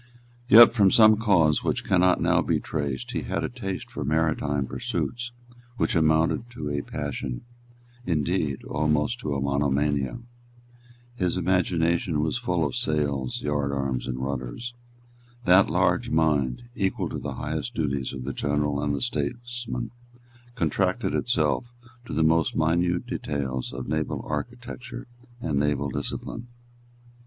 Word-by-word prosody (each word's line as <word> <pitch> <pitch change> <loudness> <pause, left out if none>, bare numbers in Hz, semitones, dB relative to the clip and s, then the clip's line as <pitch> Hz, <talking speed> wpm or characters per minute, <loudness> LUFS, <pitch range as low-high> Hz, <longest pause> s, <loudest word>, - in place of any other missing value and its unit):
Yet, 115 +1 +10
from 100 -5 +5
some 110 +1 +7
cause 95 -9 +3
which - - 0
cannot 90 -1 +4
now - - +3
be - - +1
traced, 70 -5 -3
he - - -2
had - - -2
a - - -1
taste 100 -7 -5
for - - -4
maritime 75 -2 +1
pursuits 120 - -3 0.5
which - - +1
amounted 80 +8 +2
to 75 -10 -4
a 70 0 -1
passion, 60 -3 -4 0.6
indeed 80 - -1
almost 75 +9 0
to 75 -2 -2
a - - -1
monomania. 70 - 0 1.0
His 90 -3 0
imagination 85 -2 +1
was 80 +10 0
full 90 -9 0
of 70 - -2
sails, 70 -4 -1
yardarms, 70 -3 -1
and 65 -1 -3
rudders. 65 - -4 0.7
That 95 0 +6
large - - +2
mind, 75 - +1
equal 95 -4 -1
to - - -4
the - - -5
highest 80 +11 -4
duties 70 -6 -1
of 65 -2 -6
the 70 +1 -4
general 75 +1 0
and 75 -1 0
the 70 - -4
statesman, 120 - -3 0.6
contracted 80 -10 0
itself 120 - +1 0.4
to - - -7
the 80 +2 +2
most 80 0 +3
minute 85 +2 +1
details 65 -3 -3
of 60 +1 -6
naval 80 0 -2
architecture 120 - -5 0.3
and 75 -11 -1
naval 70 -1 0
discipline. 115 - -4
75 Hz, 135 wpm, -26 LUFS, 70-95 Hz, 1.0 s, Yet